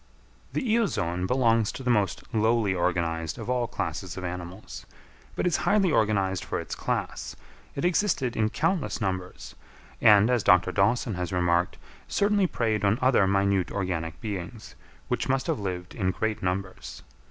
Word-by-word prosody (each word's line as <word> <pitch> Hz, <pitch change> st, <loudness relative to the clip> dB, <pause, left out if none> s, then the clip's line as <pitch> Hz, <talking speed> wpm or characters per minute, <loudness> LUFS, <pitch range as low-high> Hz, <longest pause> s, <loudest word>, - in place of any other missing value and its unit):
The -, -, -1 dB
Eozoon 95 Hz, -, 0 dB
belongs 115 Hz, -3 st, +2 dB
to 135 Hz, -, -7 dB
the 125 Hz, -, +2 dB
most 105 Hz, -4 st, +1 dB
lowly 110 Hz, -2 st, +2 dB
organised 85 Hz, -2 st, -1 dB
of 115 Hz, +1 st, -4 dB
all 125 Hz, -1 st, 0 dB
classes -, -, -4 dB
of 95 Hz, -, -5 dB
animals, 90 Hz, -, -7 dB, 0.5 s
but -, -, -1 dB
is 180 Hz, -, +2 dB
highly 200 Hz, -4 st, +2 dB
organised 100 Hz, -6 st, +1 dB
for -, -, -3 dB
its -, -, -6 dB
class; -, -, -3 dB, 0.4 s
it 140 Hz, -, -2 dB
existed 175 Hz, -, +1 dB
in 110 Hz, -1 st, +1 dB
countless 165 Hz, -, -1 dB
numbers, 95 Hz, -3 st, -4 dB, 0.5 s
and, 105 Hz, +1 st, +6 dB
as 125 Hz, -2 st, +2 dB
Dr. 90 Hz, -1 st, +4 dB
Dawson 110 Hz, +4 st, +1 dB
has 90 Hz, -2 st, -3 dB
remarked, 90 Hz, -1 st, +1 dB, 0.3 s
certainly 205 Hz, -1 st, +2 dB
preyed 110 Hz, -8 st, -1 dB
on 100 Hz, +2 st, +3 dB
other 125 Hz, -6 st, +4 dB
minute 100 Hz, -1 st, +2 dB
organic 90 Hz, -5 st, -3 dB
beings, 105 Hz, +1 st, -6 dB, 0.3 s
which -, -, -2 dB
must 135 Hz, 0 st, +1 dB
have -, -, -1 dB
lived 90 Hz, -2 st, -4 dB
in 95 Hz, -5 st, -1 dB
great 110 Hz, +3 st, -2 dB
numbers. 95 Hz, +1 st, -4 dB
100 Hz, 155 wpm, -27 LUFS, 90-125 Hz, 0.5 s, and